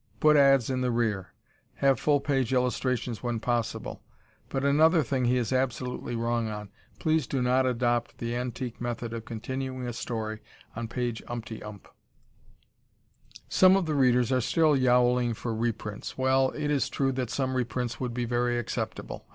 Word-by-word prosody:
Put 155 0 +5
ads 135 -3 +5
in 130 -1 -1
the 125 - +1
rear. 110 -5 -1 0.4
Have 135 -1 +3
full 145 -1 +3
page 135 -4 0
illustrations 125 -2 0
when 120 -2 -2
possible. 120 -1 -2 0.5
But 135 0 -2
another 155 +3 +5
thing 130 0 0
he 125 +1 +3
is 125 +1 -1
absolutely 125 -1 -2
wrong 115 0 0
on. 105 -1 -6 0.3
Please 160 -4 +1
do 135 - -1
not 125 +1 +2
adopt 120 -1 0
the 120 0 -3
antique 125 0 -4
method 120 -1 -3
of 115 -1 -6
continuing 130 +2 -4
a 120 - -3
story 110 -2 -4 0.4
on 115 +1 -4
page 120 -1 -3
umptyump. 110 -4 -7 1.7
Some 185 0 +6
of 195 -2 +1
the 155 - -1
readers 125 -3 +3
are 130 -1 +3
still 155 +4 +3
yowling 125 -2 +3
for 115 +1 -4
reprints. 110 -2 -3
Well, 130 0 +3
it 150 -1 -1
is 140 -2 +1
true 135 -1 0
that 130 -2 -2
some 130 0 -1
reprints 125 -1 -2
would 125 -2 -3
be 125 -1 -1
very 120 0 0
acceptable. 120 - -4
125 Hz, 165 wpm, -28 LUFS, 120-130 Hz, 1.7 s, Some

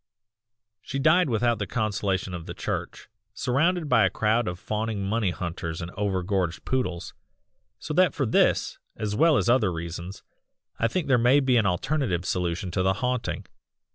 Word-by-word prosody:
"She 135 - -5
died 155 +4 +4
without 120 0 +1
the 105 - -2
consolation 100 -3 -1
of 85 -2 -6
the - - -6
Church, - - -4 0.3
surrounded 160 +6 +1
by 115 -6 +4
a 95 - +4
crowd 110 +4 +1
of 90 0 -3
fawning 105 +1 -3
money 105 0 0
hunters 85 -2 -4
and 85 0 -6
over 95 -2 -1
gorged 90 -3 -1
poodles, 90 -9 -2 0.6
so 150 +7 -5
that 185 +3 +3
for 140 - 0
this, 110 - +2 0.2
as 105 -1 -2
well 155 +3 +4
as - - 0
other 120 -6 +3
reasons 85 +3 -6 0.6
I 115 - +3
think 150 +6 -2
there 130 -3 +4
may 125 +4 +5
be 130 -3 +2
an 110 -4 +3
alternative 95 - -1
solution 90 +1 -2
to 95 - 0
the 95 +1 +2
haunting. 125 +4 -2
105 Hz, 170 wpm, -26 LUFS, 90-125 Hz, 0.6 s, may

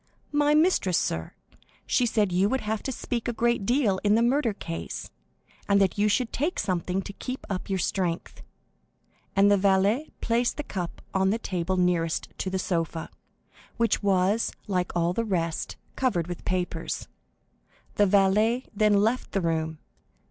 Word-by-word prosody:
"My 295 0 +3
mistress, 305 - +3
sir. 80 0 -2 0.5
She 245 - +2
said 210 -4 +1
you 185 +3 +3
would 265 +2 0
have 215 0 -2
to 265 - -3
speak 240 -1 -3
a - - +1
great 235 -3 +1
deal 235 -7 +2
in 205 0 +4
the 230 - +3
murder 250 0 +2
case, 85 - -6 0.6
and 200 0 +5
that 195 -2 +2
you 210 - +4
should 235 +3 0
take 310 +7 -1
something 185 0 -1
to 200 - -8
keep 255 +5 -6
up 185 0 -4
your 190 - +1
strength;" 180 -1 -2 0.9
and 200 +1 +5
the 205 - +5
valet 200 +8 +2
placed 235 +1 0
the 295 - -3
cup 180 -9 -5
on 190 0 +2
the 215 - +1
table 185 -4 -2
nearest 175 -2 +1
to 190 - -1
the 190 - -1
sofa, 165 -3 -2 0.7
which 230 -1 +2
was, 200 +2 +2
like 180 -4 -1
all 170 0 +1
the 230 - 0
rest, 170 -6 -2 0.2
covered 230 -11 +1
with 175 0 -7
papers. 175 -3 -2 0.9
The 205 - +3
valet 210 +5 +3
then 210 -1 +3
left 235 +4 0
the 195 - +1
room. 160 -2 -1
200 Hz, 165 wpm, -26 LUFS, 180-230 Hz, 0.9 s, and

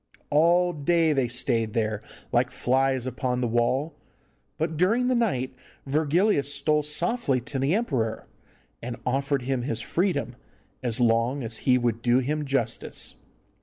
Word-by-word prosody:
All 175 +4 +4
day 160 +1 +2
they 135 -3 +1
stayed 115 -2 0
there 110 -2 -1 0.3
like - - +2
flies 130 0 +1
upon 125 -1 -2
the 125 - 0
wall, 125 +7 0 0.6
but 160 +1 -1
during 210 +10 +2
the - - +3
night 190 - 0 0.3
Virgilius 150 +2 +2
stole 150 +2 +2
softly 150 - 0
to 135 +3 -3
the 140 +7 +2
emperor, 130 - -1 0.6
and 120 0 -5
offered 135 +1 0
him 130 0 -1
his 120 -2 -2
freedom, 165 - -1 0.5
as 120 -2 -2
long 120 +3 +2
as 115 -1 -3
he 125 - +6
would 120 -2 -1
do 120 +1 +3
him 150 +4 -1
justice. 135 -5 -1
135 Hz, 145 wpm, -26 LUFS, 120-155 Hz, 0.6 s, he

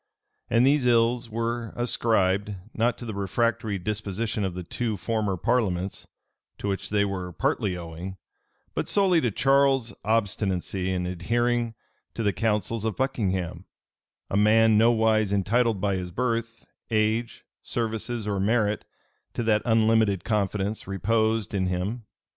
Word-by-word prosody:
And 115 +2 +4
these 140 -2 +3
ills 120 0 +3
were 115 0 -3
ascribed, 105 -4 +1 0.2
not 115 +2 +1
to 120 - -8
the 110 - -4
refractory 100 +1 0
disposition 105 +2 -2
of 95 -2 -2
the 90 - -5
two 110 +5 -2
former 105 -2 -1
parliaments, 95 -3 -1 0.5
to - - -4
which 95 -1 -2
they 100 -1 +2
were 95 -2 -4
partly 90 +2 -1
owing, 85 +3 -7 0.6
but - - -2
solely 190 -5 +3
to 120 - +1
Charles's 135 +1 +2
obstinacy 95 -4 0
in 90 -1 -1
adhering 115 +6 0 0.4
to 115 - -2
the 100 -1 +2
counsels 110 0 -1
of 110 -3 -2
Buckingham, 95 -9 -1 0.6
a - - -3
man 110 +2 +5
nowise 110 -2 +3
entitled 110 +2 +2
by 100 0 0
his 90 -1 -4
birth, 115 +2 -2 0.2
age, 110 +1 0 0.2
services, 115 -1 -3
or 100 -2 -1
merit, 105 +1 +1 0.5
to 120 - -1
that 110 -1 +3
unlimited 110 -4 +3
confidence 105 -1 -1
reposed 110 +2 0
in 95 -2 0
him. 100 +5 -3
110 Hz, 135 wpm, -26 LUFS, 95-115 Hz, 0.6 s, man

